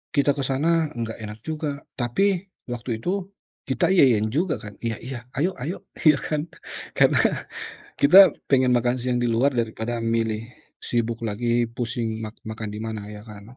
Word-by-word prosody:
kita 140 0 +4
ke 140 - -2
sana 160 +4 +2
nggak 115 -1 -4
enak 105 0 -7
juga. 150 -2 -4 0.2
Tapi 185 +10 +1 0.2
waktu 115 -2 -4
itu 190 +1 -1 0.4
kita 130 +6 +2
iya-iyain 115 - +4
juga, 160 +4 +1
kan, 105 -1 -8
iya-iya, 120 +2 -5
ayo-ayo, 165 0 -2 0.2
ya, 155 -3 +6
kan. 155 +2 -2 0.5
Karena - - +4 0.8
kita 190 +7 +8
pengen 130 -2 +3
makan 120 +1 +1
siang 125 0 0
di 120 - +1
luar 120 +3 +2
daripada 115 +1 -2
milih 115 -1 0 0.3
sibuk 115 -1 -1
lagi 120 +3 +1
pusing 115 -1 -3
mak 110 0 -7
makan 110 -1 -5
di - - -6
mana, 110 -2 -5
ya, 105 0 -9
kan. 105 +3 -12
120 Hz, 155 wpm, -24 LUFS, 110-145 Hz, 0.8 s, kita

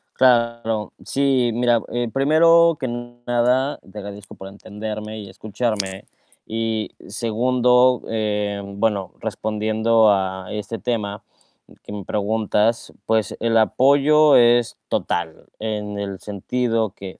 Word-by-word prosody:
Claro, 115 -3 +2
sí, 135 -3 +1
mira, 120 -2 +2
eh, 120 0 -1
primero 165 +3 +5
que 130 - -2
nada, 120 +2 -1
te 100 +2 -16
agradezco 100 -1 -9
por 95 - -10
entenderme 105 +2 -7
y 100 - -9
escucharme. 100 -1 -3 0.4
Y 110 -1 -2 0.2
segundo, 125 +3 +2
eh, 105 -2 -2
bueno, 100 -1 -2
respondiendo 110 +1 +1
a 95 -1 -1
este 105 +2 -5
tema 105 -4 -3 0.6
que - - -10
me 100 -2 -6
preguntas, 110 +2 0
pues, 110 -3 +1
el 115 -1 +1
apoyo 140 +6 +4
es 120 -1 +4
total, 80 -2 -3
en 105 -2 -4
el 100 -2 -5
sentido 115 +1 -2
que, 95 -1 -10
110 Hz, 115 wpm, -21 LUFS, 105-120 Hz, 0.6 s, primero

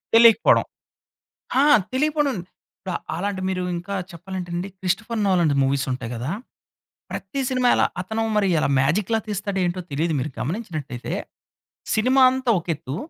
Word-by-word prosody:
తెలియకపోవడం. 230 -1 +6 1.0
ఆ! - - +5 0.3
తెలియకపోడం, 295 0 +1
ఇపుడు 185 0 -11 0.2
అలాంటి 195 +2 -2
మీరు 185 -1 -1
ఇంకా 195 +3 -5 0.2
చెప్పాలంటే 180 +1 -6
అండి, 180 +3 -3
క్రిస్టోఫర్ 210 +5 -1
నోలన్ 180 -5 +3
ది - - 0
మూవీస్ 135 0 +1
ఉంటాయి 125 -2 -4
కదా! 125 +7 -3 0.8
ప్రతి 275 - -4
సినిమా 255 -1 +1
ఎలా - - +3 0.2
అతను 220 +4 -2
మరి 200 - +3
ఎల - - +1
మ్యాజిక్‌లా 195 +11 +2
తీస్తాడో 200 -1 -2
ఏంటో 180 +1 -2
తెలీదు. 160 +4 0
మీరు 135 +3 -3
గమనించినట్టయితే, 155 - -4 0.8
సినిమా 255 +4 +4
అంతా 260 -2 0
ఒక 170 - -15
ఎత్తు. 145 -2 -6
190 Hz, 140 wpm, -23 LUFS, 160-225 Hz, 1.0 s, తెలియకపోవడం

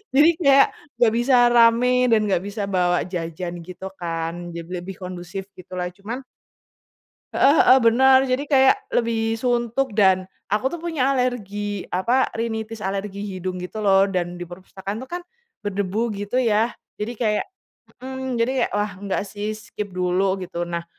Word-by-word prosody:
Jadi 300 +4 +7
kayak 275 -3 +6 0.3
nggak 230 -2 +4
bisa 250 +2 +3 0.2
rame 235 +1 +5 0.2
dan 225 - +5
nggak 195 -4 +1
bisa 205 +1 -5
bawa 175 -1 +3 0.2
jajan 170 0 -4
gitu 185 +1 -8 0.2
kan, 165 -1 -2 0.2
jadi 170 0 -7
lebih 190 +2 -7
kondusif 180 +1 -6
gitulah. 180 0 -5
Cuman 230 +7 -6 1.1
Heeh 280 - +5
heeh, 260 - +7
bener. 260 +3 +6
Jadi 260 +2 0
kayak 265 -2 +4
lebih 225 -1 0
suntuk 240 +1 0
dan 190 -3 +4 0.2
aku 215 +6 0
tuh 345 - -5
punya 310 -6 0
alergi 205 -6 -2
apa, 235 +9 +2
rhinitis 225 -1 -4
alergi 195 0 -3
hidung 185 -2 -4
gitu 210 +4 -5
loh 195 0 +5
dan 175 -2 -3
di 175 - -6
perpustakaan 190 +3 -7
itu 245 - -6
kan 350 - -2 0.4
berdebu 205 +2 -1
gitu 205 +5 -2
ya, 225 -1 +2 0.2
jadi 210 +3 -4
kayak 215 -3 +1 0.5
mhm. 260 0 -4
Jadi 230 +2 +1
kayak - - 0
wah, 205 0 0
nggak 195 +1 -3
sih 210 +2 -4
skip 210 -1 -7
dulu 185 +1 0
gitu. 180 -2 -5
Nah, 170 0 -3
210 Hz, 155 wpm, -22 LUFS, 185-240 Hz, 1.1 s, Jadi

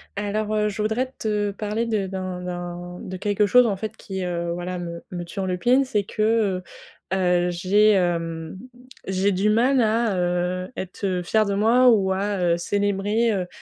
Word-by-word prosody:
Alors, 210 +1 -2
heu, 210 0 +1
je 210 +1 -4
voudrais 240 +5 -1
te 210 -2 -1
parler 210 +3 -2
de 215 -4 -1
d'un 185 -1 -5
d'un 175 0 -6
de 185 - -7
quelque 205 +2 +1
chose 250 +4 +6
en 205 -4 0
fait 215 +2 -5
qui, 190 -1 -6
heu, 170 -1 -2
voilà 175 +1 -4
me 170 -1 -6
me 175 -1 -4
turlupine. 190 +9 +1
C'est 210 -5 0
que, 215 -2 +1
heu - - -24 0.5
heu, 180 -2 +2
j'ai, 195 +5 +3
hem, 170 -3 -1 0.5
j'ai 190 +1 +1
du 195 +3 +1
mal 250 +5 +3
à, 220 -2 +1
heu, 180 +1 -1
être, 190 +2 -5
heu, 180 -2 -1
fière 215 +4 +2
de 200 - -1
moi 235 +5 +5
ou 200 -5 +3
à, 200 +2 -1
heu, 170 -1 +2
célébrer, 205 +5 0
heu 185 -3 -2
195 Hz, 180 wpm, -23 LUFS, 180-215 Hz, 0.5 s, chose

